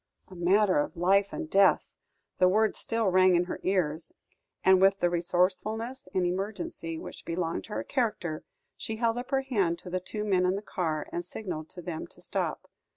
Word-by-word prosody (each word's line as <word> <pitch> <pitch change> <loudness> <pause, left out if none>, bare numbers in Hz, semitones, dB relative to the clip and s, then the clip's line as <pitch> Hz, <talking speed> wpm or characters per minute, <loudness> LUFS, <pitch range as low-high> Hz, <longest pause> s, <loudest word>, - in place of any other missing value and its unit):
"A 185 - -11
matter 185 +1 +3
of 145 - -2
life 195 +3 +3
and 320 - -4
death!" 200 -9 +4 0.5
the 185 - +6
words 215 +3 +2
still 225 -3 0
rang 185 0 +5
in 175 - +3
her 180 - -5
ears, 170 -4 -1 0.5
and 190 0 +6
with 195 +1 +5
the 175 - +2
resourcefulness 195 +8 -1
in 185 -1 +1
emergency 190 - -3
which - - -9
belonged 170 0 -2
to 215 - -9
her - - -2
character, 210 - -2 0.3
she 220 - -5
held 230 +1 0
up 245 - -7
her 270 -1 +2
hand 200 -11 0
to 180 - -9
the 185 - 0
two 210 +3 -5
men 190 -3 +2
in 185 - +1
the 200 - -5
car, 160 -7 -2
and 175 - -2
signalled 175 -4 -6
to 175 - -7
them 160 -2 -5
to - - -11
stop. - - -3
185 Hz, 195 wpm, -29 LUFS, 175-215 Hz, 0.5 s, the